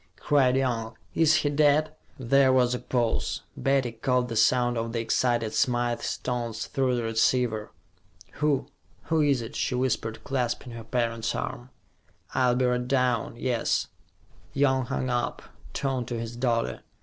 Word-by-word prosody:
cried 130 -3 +3
Young. 120 -4 -1 0.2
"Is 160 -1 +4
he 145 -2 +1
dead?" 150 +1 +3 0.2
There 135 +1 +4
was 125 -1 +3
a 125 - -2
pause; 120 -3 -1
Betty 135 -3 +1
caught 125 +2 0
the 115 - -4
sound 120 +2 +3
of 115 0 -3
the 115 - -1
excited 115 0 0
Smythe's 120 -1 0
tones 120 -3 -3
through 130 -3 0
the 120 - -1
receiver. 115 -1 +1 0.7
"Who 145 -3 +2 0.4
who 160 -1 +1
is 140 -5 +2
it?" 115 - -8
she 125 - -1
whispered, 125 -3 -1
clasping 125 -2 -2
her 115 -1 -7
parent's 115 -1 -1
arm. 120 +1 -5 0.6
"I'll 125 -2 +3
be 130 0 +2
right 125 0 0
down, 125 -4 +1
yes." 120 -1 0 0.6
Young 130 -2 +2
hung 130 -1 -2
up, 120 0 -2 0.3
turned 130 -4 -2
to 120 -2 -3
his 115 +1 -5
daughter. 120 -2 -1
125 Hz, 150 wpm, -27 LUFS, 115-130 Hz, 0.7 s, Is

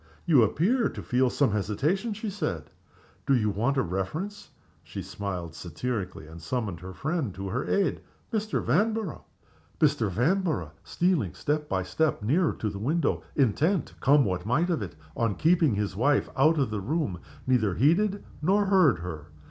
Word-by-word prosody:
"You 150 -7 +6
appear 195 - +2
to - - -8
feel 125 0 +2
some 135 -2 +2
hesitation," 150 - 0
she 215 0 -4
said. 85 - -4 0.6
"Do 135 - +5
you 105 -4 +1
want 120 +8 0
a 135 - +3
reference?" 130 - -4 0.3
She 95 +4 -7
smiled 90 -3 -5
satirically, 90 +1 -4
and 80 +2 -11
summoned 100 -1 -3
her 95 +2 -8
friend 140 - -2
to 95 0 -5
her 125 +7 -2
aid. 200 -1 +1 0.3
"Mr. 215 -1 -1
Vanborough!" 210 - 0 0.5
Mr. 140 -8 +2
Vanborough, 160 - 0
stealing 170 - 0
step 150 0 -2
by 95 -1 0
step 155 - 0
nearer 155 - +2
to 105 - -3
the 100 - -6
window 150 +7 0
intent, 150 - +1
come 140 0 +5
what 90 -2 -2
might 150 - +1
of 160 - 0
it, 95 -5 -6 0.2
on 115 -4 0
keeping 160 - +3
his 100 -2 -2
wife 140 +7 +2
out 155 +4 +4
of 135 -6 +1
the 105 -2 -2
room 125 - -1 0.3
neither 110 -7 +2
heeded 195 - +2 0.2
nor 200 +6 +3
heard 185 - +4
her. 80 -4 -6
130 Hz, 165 wpm, -27 LUFS, -, 0.6 s, You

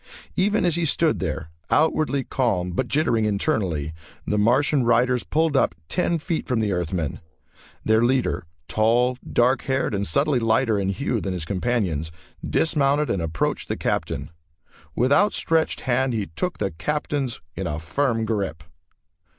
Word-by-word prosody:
Even 205 +2 +2
as 175 - +2
he 170 - 0
stood 160 +1 +2
there, 80 +1 -4 0.2
outwardly 150 -3 +2
calm 100 -11 0
but 125 +8 -1
jittering 120 -7 +2
internally, 95 - 0 0.3
the 105 - 0
Martian 130 +5 +3
riders 120 +1 +3
pulled 160 -1 +1
up 135 - +2
ten 175 -1 +1
feet 160 +1 -3
from 125 -4 +1
the 105 -2 0
Earthmen. 85 -5 -2 0.7
Their 110 +1 +4
leader, 125 -8 +1 0.2
tall, 120 +3 +2
dark 125 +3 +3
haired, 130 -4 0
and 100 0 -1
subtly 140 - +2
lighter 115 -1 +2
in 95 -1 0
hue 115 +1 -1
than 95 - -2
his 90 -3 -4
companions, 90 -6 -1 0.3
dismounted 150 -2 +1
and 95 - -1
approached 80 -1 -2
the - - -2
Captain. - - -2 0.6
With 130 +4 +3
outstretched 165 -3 +2
hand 130 0 +1
he 110 -3 -1
took 180 - -2
the 100 -2 -1
Captain's 140 - -2 0.2
in - - -3
a 75 - -2
firm 115 - 0
grip. 95 -8 -2
120 Hz, 150 wpm, -23 LUFS, 95-140 Hz, 0.7 s, Their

